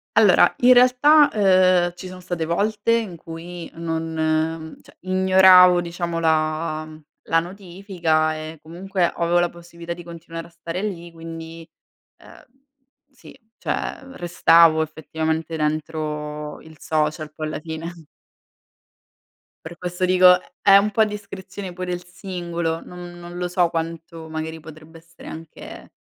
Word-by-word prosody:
Allora 210 Hz, -5 st, +5 dB
in 250 Hz, +1 st, +7 dB
realtà, 255 Hz, +5 st, +6 dB
uhm, 185 Hz, -3 st, +4 dB
ci 185 Hz, -, -9 dB
sono 185 Hz, 0 st, -10 dB
state 175 Hz, -2 st, -4 dB
volte 205 Hz, +6 st, 0 dB
in 225 Hz, -6 st, 0 dB
cui, 165 Hz, +2 st, -9 dB
non 160 Hz, -1 st, -2 dB
cioè -, -, -20 dB
ignoravo 185 Hz, -1 st, +6 dB
diciamo 170 Hz, 0 st, -4 dB
la 155 Hz, -1 st, 0 dB
mhmm, 155 Hz, 0 st, -13 dB, 0.3 s
la 165 Hz, -, +4 dB
notifica 175 Hz, -3 st, -2 dB
e 155 Hz, 0 st, -8 dB
comunque, 180 Hz, +3 st, -2 dB
avevo 170 Hz, +1 st, +1 dB
la 175 Hz, 0 st, +1 dB
possibilità 170 Hz, 0 st, -9 dB
di 175 Hz, -, -10 dB
continuare 165 Hz, 0 st, -9 dB
a -, -, -18 dB
stare 170 Hz, +3 st, -6 dB
lì, 175 Hz, -5 st, -5 dB
quindi, 165 Hz, 0 st, -9 dB, 0.6 s
uhm, -, -, -16 dB, 0.7 s
sì, 270 Hz, -, -16 dB, 0.2 s
cioè -, -, -3 dB
restavo 170 Hz, -4 st, +4 dB
effettivamente 160 Hz, +1 st, -3 dB
dentro 150 Hz, -1 st, -3 dB
il 160 Hz, -1 st, -15 dB
social 155 Hz, 0 st, -2 dB
poi 155 Hz, 0 st, -5 dB
alla 155 Hz, -, -4 dB
fine. 165 Hz, +1 st, -8 dB, 1.6 s
Per 170 Hz, +1 st, -9 dB
questo 180 Hz, 0 st, -5 dB
dico, 180 Hz, 0 st, +6 dB
è -, -, -22 dB
è 195 Hz, -1 st, +7 dB
un 205 Hz, +1 st, +2 dB
po' 220 Hz, +2 st, +3 dB
discrezione 200 Hz, -2 st, -7 dB
pure 185 Hz, 0 st, -5 dB
il 175 Hz, 0 st, -5 dB
singolo, 175 Hz, -3 st, -4 dB
non 175 Hz, 0 st, -10 dB
non 175 Hz, 0 st, -9 dB
lo 180 Hz, -, -2 dB
so 180 Hz, 0 st, +2 dB
quanto 165 Hz, 0 st, -5 dB
magari 160 Hz, +1 st, -5 dB
potrebbe 155 Hz, +1 st, -13 dB
essere 165 Hz, +1 st, -16 dB
anche 160 Hz, 0 st, -10 dB
170 Hz, 140 wpm, -22 LUFS, 160-185 Hz, 1.6 s, in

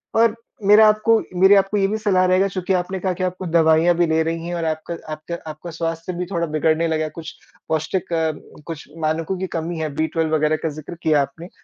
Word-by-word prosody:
और 225 Hz, 0 st, +4 dB, 0.3 s
मेरा 210 Hz, +2 st, +7 dB
आपको 215 Hz, +2 st, +4 dB, 0.2 s
मेरी 190 Hz, +2 st, +7 dB
आपको 195 Hz, +1 st, +2 dB
ये 195 Hz, -1 st, +3 dB
भी 215 Hz, +2 st, -1 dB
सलाह 195 Hz, -4 st, +2 dB
रहेगा 185 Hz, +2 st, +3 dB
चूँकि 185 Hz, 0 st, -2 dB
आपने 185 Hz, +1 st, -1 dB
कहा 185 Hz, 0 st, -1 dB
कि 185 Hz, +1 st, -4 dB
आपको 185 Hz, +1 st, -3 dB
दवाइयाँ 165 Hz, +1 st, +4 dB
भी 175 Hz, +1 st, +3 dB
ले 160 Hz, 0 st, +2 dB
रही 165 Hz, +1 st, -3 dB
हैं 175 Hz, -, -3 dB
और 170 Hz, -1 st, -2 dB
आपका 160 Hz, +1 st, -3 dB, 0.2 s
आपका 155 Hz, +3 st, -6 dB
आपका 155 Hz, +3 st, -9 dB
स्वास्थ्य 165 Hz, +2 st, -4 dB
भी 180 Hz, +1 st, -3 dB
थोड़ा 170 Hz, -3 st, -1 dB
बिगड़ने 155 Hz, +2 st, +1 dB
लगा 155 Hz, -1 st, 0 dB
है, 155 Hz, -, -3 dB
कुछ 160 Hz, +1 st, -9 dB, 0.4 s
पौष्टिक 160 Hz, +3 st, -2 dB
अ, 160 Hz, -1 st, +1 dB, 0.3 s
कुछ 165 Hz, -4 st, -7 dB
मानकों 160 Hz, +3 st, -1 dB
की 190 Hz, -, -2 dB
कमी 165 Hz, +1 st, -3 dB
है 155 Hz, -1 st, -2 dB
बी-12 160 Hz, 0 st, -1 dB
वग़ैरह 155 Hz, 0 st, +2 dB
का 160 Hz, -, 0 dB
ज़िक्र 155 Hz, +3 st, -8 dB
किया 155 Hz, -3 st, +3 dB
आपने। 165 Hz, +6 st, -6 dB
170 Hz, 220 wpm, -21 LUFS, 160-185 Hz, 0.4 s, मेरा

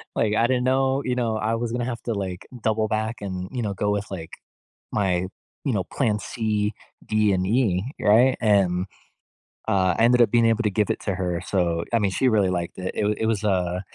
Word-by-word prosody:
like, 105 Hz, -1 st, +1 dB
I 115 Hz, +2 st, +3 dB
didn't 125 Hz, 0 st, +1 dB
know, 135 Hz, +1 st, +2 dB
you 125 Hz, -1 st, 0 dB
know, 115 Hz, -3 st, 0 dB
I 110 Hz, +2 st, 0 dB
was 115 Hz, 0 st, -3 dB
gonna 120 Hz, 0 st, -1 dB
have 120 Hz, -2 st, -4 dB
to, 115 Hz, -, -2 dB
like, 95 Hz, -3 st, -5 dB, 0.2 s
double 110 Hz, -1 st, +1 dB
back 110 Hz, +2 st, -2 dB
and, 95 Hz, -2 st, -5 dB
you 125 Hz, -2 st, -3 dB
know, 105 Hz, -3 st, -2 dB
go 105 Hz, +2 st, -1 dB
with, 105 Hz, 0 st, -2 dB
like, 80 Hz, -4 st, -6 dB, 0.6 s
my, 95 Hz, -3 st, +1 dB, 0.4 s
you 135 Hz, -, +1 dB
know, 95 Hz, -3 st, 0 dB
plan 105 Hz, -1 st, 0 dB
C, 105 Hz, -2 st, -1 dB, 0.3 s
D, 105 Hz, -2 st, +2 dB
and 90 Hz, 0 st, 0 dB
E, 100 Hz, -4 st, +1 dB, 0.2 s
right? 120 Hz, +5 st, +5 dB
And, 95 Hz, -5 st, +2 dB, 0.8 s
uh, 95 Hz, -4 st, +2 dB
I -, -, +3 dB
ended 120 Hz, +1 st, +5 dB
up 120 Hz, -, +5 dB
being 120 Hz, -1 st, +4 dB
able 115 Hz, +1 st, +3 dB
to 105 Hz, -, +2 dB
give 105 Hz, 0 st, 0 dB
it -, -, -2 dB
to 100 Hz, -3 st, -1 dB
her. 90 Hz, -2 st, -2 dB
So, 85 Hz, -3 st, 0 dB
I -, -, +5 dB
mean, 100 Hz, -2 st, +1 dB
she 130 Hz, +6 st, +2 dB
really 105 Hz, -5 st, +3 dB
liked 85 Hz, -1 st, -3 dB
it. 95 Hz, 0 st, -4 dB
It -, -, 0 dB
wa 105 Hz, -, +2 dB
it 110 Hz, -, -1 dB
was, 110 Hz, -2 st, 0 dB
uh 90 Hz, -2 st, 0 dB
105 Hz, 230 wpm, -24 LUFS, 95-115 Hz, 0.8 s, right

